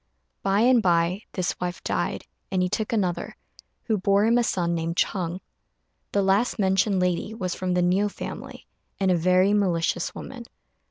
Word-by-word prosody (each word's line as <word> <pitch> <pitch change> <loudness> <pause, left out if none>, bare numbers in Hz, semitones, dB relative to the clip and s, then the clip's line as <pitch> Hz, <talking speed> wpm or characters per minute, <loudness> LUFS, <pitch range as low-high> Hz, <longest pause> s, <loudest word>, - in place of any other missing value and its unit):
By 195 +2 +2
and 245 0 +5
by 175 +1 +1
this 185 -2 -1
wife 180 0 -4
died, - - -2 0.2
and 185 -1 +1
he 180 - 0
took 215 +3 -2
another, 180 -6 -1 0.5
who 220 -4 0
bore 200 +2 +3
him 235 +2 +4
a - - +2
son 175 -6 0
named 165 0 -2
Ch'êng. 180 -1 -1 0.7
The 200 - +1
last 195 +5 +2
mentioned 195 0 +2
lady 180 +4 -1
was 185 -5 -3
from 185 -1 -2
the 180 - +2
Niu 190 +4 +2
family, - - -8 0.3
and 190 -1 +2
a - - +4
very 185 +3 +3
malicious 180 -5 0
woman. - - -8
190 Hz, 170 wpm, -25 LUFS, 180-205 Hz, 0.7 s, and